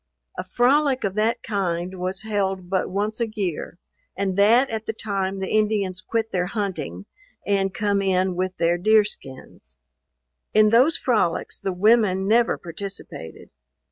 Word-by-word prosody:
A -, -, -4 dB
frolic 270 Hz, +2 st, +2 dB
of 195 Hz, -, -1 dB
that 215 Hz, +3 st, 0 dB
kind 185 Hz, -3 st, -2 dB
was 185 Hz, +2 st, -2 dB
held 195 Hz, -4 st, -2 dB
but 190 Hz, -, 0 dB
once 210 Hz, +4 st, -2 dB
a 230 Hz, -, 0 dB
year, 190 Hz, -6 st, -4 dB, 0.4 s
and 195 Hz, -1 st, -1 dB
that 225 Hz, +7 st, +5 dB
at 220 Hz, -1 st, -4 dB
the 220 Hz, -, -1 dB
time 195 Hz, -3 st, -2 dB
the 190 Hz, -1 st, -4 dB
Indians 205 Hz, -4 st, 0 dB
quit 225 Hz, +3 st, -2 dB
their 180 Hz, -1 st, 0 dB
hunting, 185 Hz, -, -4 dB, 0.4 s
and 195 Hz, -1 st, +1 dB
come 200 Hz, 0 st, 0 dB
in 185 Hz, -1 st, +1 dB
with 185 Hz, +1 st, -2 dB
their 170 Hz, +1 st, +1 dB
deer 215 Hz, +3 st, +5 dB
skins. 130 Hz, -, -8 dB, 0.8 s
In 215 Hz, 0 st, +6 dB
those 260 Hz, +8 st, +5 dB
frolics 220 Hz, -9 st, 0 dB
the 195 Hz, -, -2 dB
women 195 Hz, 0 st, +3 dB
never 230 Hz, +2 st, +3 dB
participated. 170 Hz, -, -8 dB
200 Hz, 150 wpm, -23 LUFS, 185-215 Hz, 0.8 s, In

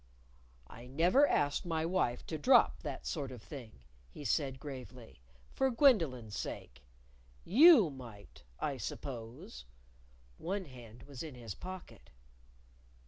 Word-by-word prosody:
"I 120 Hz, -, -12 dB
never 175 Hz, -, +4 dB
asked 145 Hz, -, +1 dB
my 160 Hz, -2 st, -1 dB
wife 165 Hz, -9 st, 0 dB
to 160 Hz, -, -5 dB
drop 260 Hz, -, +5 dB
that -, -, -6 dB
sort 140 Hz, -5 st, -3 dB
of 120 Hz, -4 st, -10 dB
thing," 120 Hz, -, -10 dB, 0.3 s
he 145 Hz, -, -10 dB
said 135 Hz, +1 st, 0 dB
gravely, 125 Hz, -, -10 dB
" -, -, -28 dB
for 265 Hz, -, +2 dB
Gwendolyn's 165 Hz, -, +3 dB
sake. 60 Hz, +1 st, -6 dB, 0.6 s
You 245 Hz, -, +7 dB
might, 115 Hz, -, -12 dB, 0.2 s
I 140 Hz, -, -2 dB
suppose." 115 Hz, -, -7 dB, 0.7 s
One 190 Hz, +3 st, -3 dB
hand 120 Hz, -4 st, -13 dB
was 140 Hz, -3 st, -9 dB
in 155 Hz, -5 st, -7 dB
his 115 Hz, -5 st, -7 dB
pocket. 185 Hz, -, -10 dB
135 Hz, 130 wpm, -33 LUFS, 120-175 Hz, 0.7 s, You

